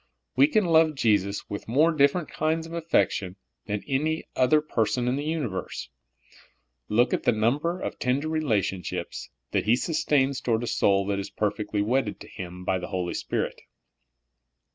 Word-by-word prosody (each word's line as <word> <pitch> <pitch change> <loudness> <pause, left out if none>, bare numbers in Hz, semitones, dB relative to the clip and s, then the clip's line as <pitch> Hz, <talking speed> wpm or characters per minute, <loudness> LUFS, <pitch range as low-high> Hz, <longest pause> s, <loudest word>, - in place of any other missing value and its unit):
We 135 +3 +6
can 210 +6 +2
love 160 -2 +4
Jesus 100 -5 +1
with 100 - -6
more 150 +9 +4
different 150 +2 +2
kinds 160 +1 -1
of 165 - -10
af 165 -1 -5
fection 95 - +1 0.3
than 105 -1 -2
any 155 +3 0
other 130 +4 +4
person 125 -4 0
in 125 - +1
the 145 - -2
universe. 145 - -3 1.0
Look 120 +4 +3
at - - +1
the - - +3
number 140 +11 0
of - - -5
tender 135 +5 0
relationships 110 - -2 0.2
that - - 0
He 110 +3 +5
sustains 140 -2 +1
toward 115 -1 0
a - - -1
soul 100 -3 +2
that 100 0 -1
is 100 - -5
perfecth' 105 0 -2
wedded 105 +2 0
to - - -9
Him 90 0 -8
by 95 0 +1
the 90 - -5
Holy 90 -2 -2
Spirit. - - -3
125 Hz, 165 wpm, -26 LUFS, 105-155 Hz, 1.0 s, We